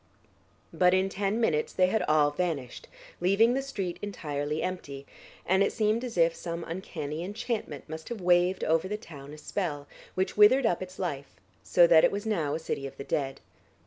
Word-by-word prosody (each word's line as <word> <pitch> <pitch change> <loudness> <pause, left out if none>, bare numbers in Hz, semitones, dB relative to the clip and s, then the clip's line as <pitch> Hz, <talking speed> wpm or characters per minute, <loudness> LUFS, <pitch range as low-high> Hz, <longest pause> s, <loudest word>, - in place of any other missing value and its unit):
But 180 +2 +4
in 190 +1 +1
ten 200 +3 -1
minutes 155 -10 +1
they 185 - +4
had 215 +4 +1
all 150 -1 +4
vanished, 145 -6 -3 0.3
leaving 200 +7 +4
the 270 - 0
street 195 -10 -4
entirely 150 -6 -3
empty, 140 -7 -5 0.4
and 190 +2 +3
it 200 - +3
seemed 220 +1 +1
as 240 -6 -5
if 165 0 +4
some 170 0 -5
uncanny 165 -3 -5
enchantment 205 - -4
must 160 +1 -8
have 235 -2 -5
waved 180 +1 +3
over 165 +3 +2
the 210 +2 -3
town 145 -9 -11
a 150 - -10
spell, 150 -3 -3 0.3
which 185 0 -1
withered 230 +6 +6
up 180 -6 +1
its 185 0 -8
life, 145 -7 -4 0.3
so 175 - +5
that 165 -2 +6
it - - +5
was 200 +2 -4
now 165 -10 0
a - - -3
city 140 -3 -4
of - - -12
the - - -6
dead. 135 -1 -2
180 Hz, 190 wpm, -28 LUFS, 155-200 Hz, 0.4 s, withered